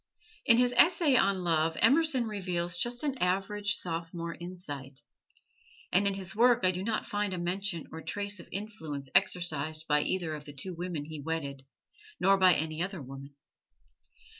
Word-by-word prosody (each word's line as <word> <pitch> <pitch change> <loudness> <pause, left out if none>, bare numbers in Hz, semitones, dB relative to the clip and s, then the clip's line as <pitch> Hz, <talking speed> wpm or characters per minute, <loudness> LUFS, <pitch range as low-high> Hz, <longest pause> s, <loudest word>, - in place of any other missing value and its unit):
In 230 -3 +7
his 245 0 +3
"Essay 335 -5 +5
on 195 -5 +3
Love" 160 -1 +1
Emerson 275 0 +4
reveals 180 -4 -1
just 240 +8 -2
an 275 -3 -2
average 200 +3 0
sophomore 170 -1 -4
insight; 145 -7 -6 0.9
and 200 +3 +3
in 200 - 0
his 190 -2 -6
work 245 +2 +5
I 185 - +5
do 180 0 -4
not 220 +1 -1
find 205 -2 -2
a - - -5
mention 175 0 -2
or 160 - -7
a - - -11
trace 205 -1 -2
of - - -12
influence 160 -10 -6
exercised 155 -2 +1
by 150 0 +3
either 170 -1 -1
of 150 -1 -7
the 145 - -9
two 180 +7 -5
women 170 -3 -4
he 155 0 -7
wedded, 140 -3 -4 0.5
nor 195 0 +4
by 185 -2 +6
any 155 +1 -2
other 190 0 -3
woman. 135 +1 -10
180 Hz, 170 wpm, -30 LUFS, 160-205 Hz, 0.9 s, In